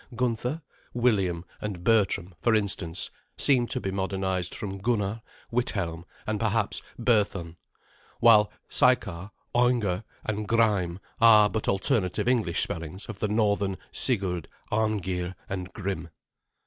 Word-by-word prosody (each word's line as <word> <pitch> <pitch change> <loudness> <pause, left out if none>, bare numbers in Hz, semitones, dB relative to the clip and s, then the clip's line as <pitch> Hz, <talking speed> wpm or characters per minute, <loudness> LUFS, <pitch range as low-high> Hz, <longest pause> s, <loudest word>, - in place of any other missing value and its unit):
Gunther, 125 +5 -1 0.3
William, 95 -8 +1 0.2
and 100 -5 -5
Bertram, 100 -4 +2
for 115 -2 +2
instance, 95 -5 0 0.3
seem 125 -4 +4
to 130 - 0
be 95 - -3
modernized 95 -2 -2
from 100 -2 -5
Gunnar, 105 0 -1 0.3
Withelm, 95 -8 -1 0.2
and 110 -1 -2
perhaps 110 -1 +1 0.2
Berthun; 105 -8 0 0.6
while 110 -3 +6 0.2
Sykar, 100 -7 +1 0.2
Aunger, 120 -6 +2 0.2
and 105 -1 -3
Gryme 100 -6 +2 0.2
are 105 -3 +7
but 110 +1 -3
alternative 95 +1 +1
English 115 -9 +2
spellings 85 +4 -3
of 110 -3 -8
the 110 - 0
northern 100 -2 +1
Sigurd, 95 - +2 0.2
Arngeir, 95 -4 -1
and 95 -1 -5
Grim. 95 -5 -4
100 Hz, 120 wpm, -27 LUFS, 95-115 Hz, 0.6 s, are